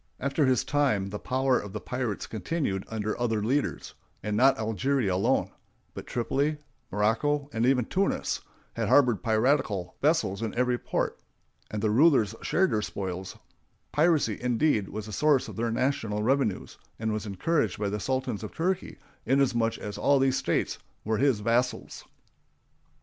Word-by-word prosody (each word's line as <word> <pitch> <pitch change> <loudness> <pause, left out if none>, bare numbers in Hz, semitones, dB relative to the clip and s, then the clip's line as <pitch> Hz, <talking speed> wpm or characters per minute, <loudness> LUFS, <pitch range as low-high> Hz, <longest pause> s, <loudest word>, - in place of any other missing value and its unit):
After 140 +1 +1
his 130 -3 +3
time 130 -10 +1
the 105 +1 -5
power 130 0 +1
of 105 -2 -8
the 105 - -3
pirates 120 -2 -3
continued 110 - -2
under 110 -1 -2
other 115 -3 0
leaders; 135 +6 -1 0.3
and 105 0 -1
not 130 +5 +5
Algeria 110 0 0
alone, 115 +8 +1 0.4
but - - -8
Tripoli, 140 +6 0 0.3
Morocco, 140 +8 +1
and 115 +2 +1
even 125 -3 +3
Tunis, 195 +9 -1 0.3
harbored 125 -7 +3
piratical 110 -5 +1
vessels 145 - +1
in 110 -2 -3
every 125 0 +1
port, - - -2 0.5
and 105 0 -4
the 110 - +2
rulers 125 -4 +4
shared 190 +1 +2
their 105 - +1
spoils; 95 -2 -5 0.5
piracy, 150 - +2
indeed, 125 -3 +1
was 105 +1 -5
the 110 - -8
source 150 +2 +3
of - - -8
their 115 +1 -1
national 115 -4 -1
revenues, 130 -4 0 0.2
and 110 -1 -1
was 110 0 -3
encouraged 110 - 0
by 105 -1 -1
the 105 +1 -3
Sultan 130 -3 -2
of 110 - -8
Turkey 185 +3 -1 0.3
inasmuch 120 -3 +2
as 105 -1 -6
all 140 0 +4
these 135 -1 +2
states 135 - -1 0.3
were 110 0 0
his 135 -6 +2
vassals. 115 +2 -1
120 Hz, 155 wpm, -28 LUFS, 105-140 Hz, 0.5 s, not